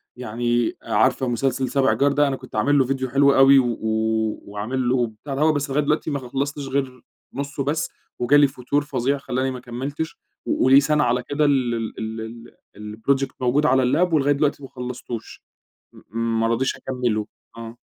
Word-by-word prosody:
يعني 120 0 -1
عارفة 130 - +1
مسلسل 130 +1 0
سابع 135 +1 +2
جار 140 +1 +2
ده؟ 145 +1 +3
أنا 135 - -1
كنت 130 -2 -12
عامل 140 +7 +3
له 130 - +2
ڤيديو 135 -1 -1
حلو 140 0 +5
أوي 135 +1 +7
و 120 -3 0 0.7
وعامل 115 +5 -3
له 125 -1 +2
بتاع 115 +6 -8
دهو، 155 +3 +3
بس 145 -1 -2
لغاية 145 +2 +1
دلوقتي 150 +2 0
ما 140 - -1
خلصتش 135 +2 -4
غير 130 -2 -2 0.3
نصه 140 +1 -4
بس 150 +4 -1 0.3
وجالي 145 +4 +5
فتور 135 +2 -1
فظيع 140 -1 -1
خلّاني 130 -1 -2
ما 130 - -6
كملتش 135 +6 -5 0.3
وقولي 135 +2 +5
سنة 150 +1 +2
على 125 0 +1
كده 145 +3 0
ال 130 -4 +2
ال 115 -1 -3
ال 110 +1 -6 0.3
ال 105 +1 -8 0.2
الproject 135 0 -3
موجود 130 +4 +2
على 130 -1 +4
اللاب 160 +8 +2
ولغاية 145 -2 +3
دلوقتي 145 0 0
ما 135 - -9
خلصتوش 125 -2 -7 0.5
م 115 +3 -3
ما 115 - +2
رضيش 120 +3 0
أكمله. 120 -5 -2 0.3
آه. 115 +1 -9
130 Hz, 175 wpm, -22 LUFS, 120-140 Hz, 0.7 s, أوي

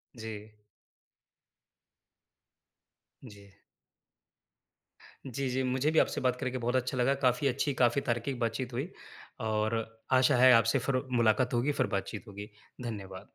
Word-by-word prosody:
जी। 110 -1 -8 2.7
जी। 100 -4 -14 1.8
जी, 135 +1 -3
जी। 130 +1 -1
मुझे 130 +4 0
भी 160 - +4
आपसे - - +1
बात 125 -1 +1
करके 130 -1 -2
बहुत 120 +1 -1
अच्छा 130 +1 -1
लगा। 130 +2 +3
काफ़ी 125 +2 +3
अच्छी, 135 +2 0
काफ़ी 125 +2 +2
तार्किक 120 +2 -2
बातचीत 120 +1 -2
हुई 135 +8 -2 0.6
और 110 +1 0 0.4
आशा 130 - +4
है 130 +1 +7
आपसे 115 +4 +4
फिर 130 -2 +1
मुलाकात 120 +1 +2
होगी, 120 +5 +1
फिर 140 - 0
बात-चीत 100 +4 -6
होगी। 100 +1 -9 0.3
धन्यवाद। 100 -4 -7
120 Hz, 130 wpm, -30 LUFS, 110-130 Hz, 2.7 s, है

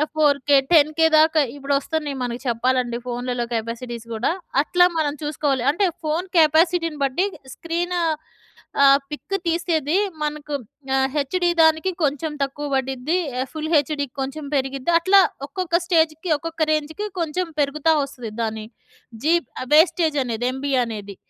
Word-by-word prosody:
ఫోర్‌‌కే, 285 -2 +3 0.2
ten K 310 +1 +5
దాకా 315 0 +5
ఇప్పుడు 280 0 -2
వస్తున్నాయి 295 -1 -3
మనకు 240 0 -4
చెప్పాలంటే 245 0 0
ఫోన్లలో 245 0 -3
కెపాసిటీస్ 230 +1 -4
కూడా 225 +7 0 0.3
అట్లా 355 +4 +4
మనం 295 -2 0
చూసుకోవాలి. 290 -4 -1
అంటే 385 +4 +1 0.2
ఫోన్ 320 +5 -1
కెపాసిటీని 330 0 +3
బట్టి 275 +8 +1 0.3
స్క్రీన్ 345 +2 -3 0.9
ఆహ్, 275 0 +7
పిక్ 340 +6 -4
తీసేది 330 -1 0 0.3
మనకు 300 0 -4 0.4
ఆహ్, 265 0 +2
హెచ్‍డీ 350 +5 0
దానికి 320 +4 +3
కొంచెం 295 +2 0
తక్కువ 290 +2 -4
పడిద్ది. 265 +5 -1 0.2
ఎ 260 - -1
ఫుల్‌హెచ్‍డికి 305 -3 0
కొంచెం 280 +3 -5
పెరిగిద్ది. 270 +3 -1
అట్లా 390 +3 +6 0.3
ఒక్కొక్క 345 0 -1
స్టేజ్‌కి, 320 0 +1
ఒక్కొక్క 330 +1 -7
రేంజ్‌కి 315 +7 -3
కొంచెం 340 +3 -2
పెరుగుతా 305 +3 +2
వస్తది 245 -5 -7
దాని 220 -1 -4 0.6
జీప్ 335 -4 +2 0.2
వేస్టేజ్ 320 -1 +4
అనేది, 240 0 -2
ఎంబీ 275 +1 -3
అనేది. 205 -4 -7
300 Hz, 130 wpm, -22 LUFS, 265-325 Hz, 0.9 s, ఆహ్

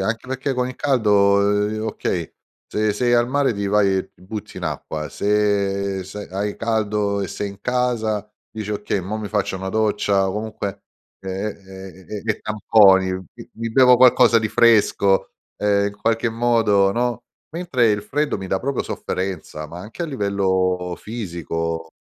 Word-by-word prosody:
anche 110 +5 -2
perché 130 +1 -2
con 125 0 0
il 130 - -6
caldo, 105 -7 +3 0.3
ehm, 110 +1 -3
okay, 85 -6 -3 0.3
se 105 0 0
sei 120 +3 +1
al 120 +1 +3
mare 140 -2 +2
ti 100 0 -2
vai 100 -2 +3
ti - - -23
butti 105 +2 -7
in - - -5
acqua, 75 0 -4
se 100 -2 0
se 105 +2 -8
hai 100 +2 -3
caldo 105 -3 0
e 95 - -3
sei 105 - -4
in 100 0 -14
casa 115 -4 -1 0.2
dici: 105 -1 -6
"Okay, 105 -1 -2
mo' 100 +4 -4
mi 105 -2 -5
faccio 105 -2 -1
una 95 +1 -5
doccia." 105 -2 +1
O - - -2
comunque 105 -2 -5 0.4
e 95 - -8
e 95 -1 -7
e 105 -1 -5
e 110 -2 -1
tamponi: 100 -3 +4
"Mi 95 -2 -9
mi 115 0 -4
bevo 125 +1 +6
qualcosa 125 -2 +6
di 110 - -1
fresco." 100 -4 +3 0.3
Ehm, 100 -1 +2
in 100 - -12
qualche 115 +2 0
modo, 115 -4 +3
no. 120 +1 -1 0.3
Mentre 145 -9 +1
il 105 0 0
freddo 145 +6 -1
mi 95 -1 -6
dà 95 - 0
proprio 135 +3 -2
sofferenza, 90 -4 -4
ma 85 +3 -9
anche 110 - -7
a - - -2
livello 95 - 0
fisico. 85 -6 -4
105 Hz, 170 wpm, -21 LUFS, 95-115 Hz, 0.4 s, bevo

